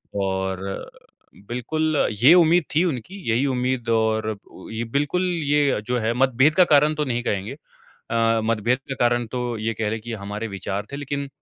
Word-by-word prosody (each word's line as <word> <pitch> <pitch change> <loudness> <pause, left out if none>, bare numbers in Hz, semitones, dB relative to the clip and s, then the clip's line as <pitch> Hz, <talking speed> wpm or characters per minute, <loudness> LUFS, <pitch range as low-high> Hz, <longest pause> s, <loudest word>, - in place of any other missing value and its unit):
और 95 0 -3 0.6
बिल्कुल 155 +6 0 0.2
ये 145 +6 +9
उम्मीद 175 0 +5
थी 160 - +4
उनकी 155 - -4
यही 120 +5 +2
उम्मीद 125 -1 -1
और 110 -1 +1 0.3
ये 110 +1 -3
बिल्कुल 145 +6 0 0.2
ये 145 -5 +2
जो 125 0 0
है 110 +1 0
मतभेद 130 +4 +3
का 185 - +7
कारण 150 +2 +5
तो 150 0 -1
नहीं 120 -2 -2
कहेंगे। 100 +4 -2 0.6
अ, 115 0 +2
मतभेद 115 +3 +1
का 135 - -2
कारण 120 0 +2
तो 125 -2 -2
ये 110 +1 -1
कहलें 110 0 -2
कि 120 +2 -7
हमारे 105 +1 -5
विचार 100 +1 -4
थे - - -4
लेकिन 140 0 -4
120 Hz, 170 wpm, -23 LUFS, 110-140 Hz, 0.6 s, ये